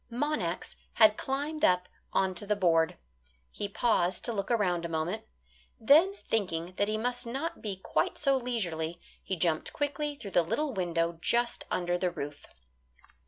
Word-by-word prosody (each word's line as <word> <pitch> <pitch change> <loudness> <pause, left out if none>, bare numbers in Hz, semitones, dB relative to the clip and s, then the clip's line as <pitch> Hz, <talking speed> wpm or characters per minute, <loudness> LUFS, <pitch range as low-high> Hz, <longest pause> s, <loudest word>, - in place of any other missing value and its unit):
Monax 295 +5 -2 0.2
had 215 -1 +6
climbed 290 +5 -3
up 180 - +4 0.2
onto 190 0 0
the 210 - +2
board. 165 -4 +3 0.5
He 205 - -4
paused 190 -5 +1
to 235 - -1
look 200 -2 -3
around 185 -7 +1
a 170 - -3
moment. 165 +6 -2 0.5
Then 315 - +6
thinking 180 -5 -1
that 205 - +2
he 215 0 0
must 245 +1 -2
not 275 +8 -3
be 205 -3 -3
quite 190 - -1
so 275 -2 +3
leisurely, 175 -10 -2 0.2
he 190 - -2
jumped 160 -2 0
quickly 290 0 -1
through 215 -8 -8
the 175 - +5
little 275 - -1
window 170 -3 -1
just 240 +4 +1
under 175 0 0
the 180 - +1
roof. 145 -4 -7
205 Hz, 160 wpm, -30 LUFS, 175-245 Hz, 0.5 s, had